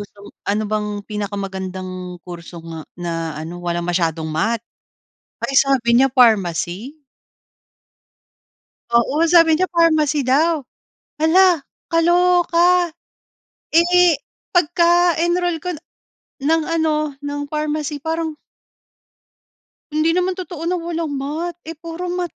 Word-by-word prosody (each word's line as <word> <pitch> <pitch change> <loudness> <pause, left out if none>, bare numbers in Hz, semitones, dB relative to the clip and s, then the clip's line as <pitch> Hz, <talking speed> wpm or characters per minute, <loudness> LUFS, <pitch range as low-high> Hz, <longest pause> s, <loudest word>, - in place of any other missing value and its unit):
gustom 205 0 -11 0.2
ano 210 +2 +1
bang 215 0 -1 0.2
pinakamagandang 190 -3 -5
kurso 175 0 -9
nga, 165 -1 -7 0.2
na 165 -2 -4
ano, 170 +3 -7
walang 170 0 -2
masyadong 165 -2 0
math. 225 +9 -1 0.8
Ay, - - -2
sabi 260 -4 +2
niya 270 - +5
pharmacy? 220 - +2 1.9
Oo, 235 +6 +2
sabi 330 -2 +6
niya 370 +4 +1
pharmacy 315 -4 +2
daw. 295 +2 +2 0.5
Hala! 330 0 +4 0.2
Kaloka. 350 0 +3 0.8
Eh, 345 -1 +5 0.3
pagka-enroll 345 0 +2
ko 360 - -2
na - - -14 0.7
ng 325 0 +3 0.2
ano, 315 -1 +2 0.3
ng 290 0 -4
pharmacy 300 -1 -2
parang 320 -1 -2 1.6
Hindi 310 +2 +1
naman 365 +1 0
totoo 350 -3 -6
na 360 - 0
walang 335 -2 -3
math. 315 +5 -4
Eh, 325 - -6
puro 330 +2 -7
math 355 -1 -3
305 Hz, 105 wpm, -20 LUFS, 205-340 Hz, 1.9 s, sabi